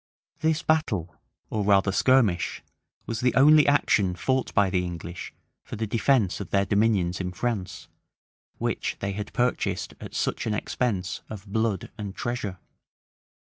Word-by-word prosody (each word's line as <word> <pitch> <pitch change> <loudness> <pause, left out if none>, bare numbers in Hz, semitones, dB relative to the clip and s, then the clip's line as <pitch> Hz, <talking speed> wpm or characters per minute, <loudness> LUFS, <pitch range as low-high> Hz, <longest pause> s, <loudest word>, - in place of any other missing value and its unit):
[] - - -73
This 160 0 +1
battle, 110 - 0 0.4
or 105 -2 0
rather 100 -1 +4
skirmish, 110 -6 +2 0.4
was 115 -2 -3
the 125 +1 +1
only 150 +2 +7
action 105 -10 +3
fought 130 +7 0
by 100 -3 +3
the 90 -1 +1
English 85 0 -6 0.3
for - - -7
the 110 - -2
defence 115 -2 +2
of 100 - -6
their 100 0 +2
dominions 100 -4 +1
in 90 -1 -3
France, 100 -1 -3 0.7
which - - -2
they 100 - -2
had 105 +1 -5
purchased 125 0 -1
at - - -9
such - - -1
an 105 - 0
expense 95 -7 -2
of 105 -2 -8
blood 110 -1 -1
and 100 -2 -5
treasure. 115 -6 -3
105 Hz, 150 wpm, -26 LUFS, 95-120 Hz, 0.7 s, only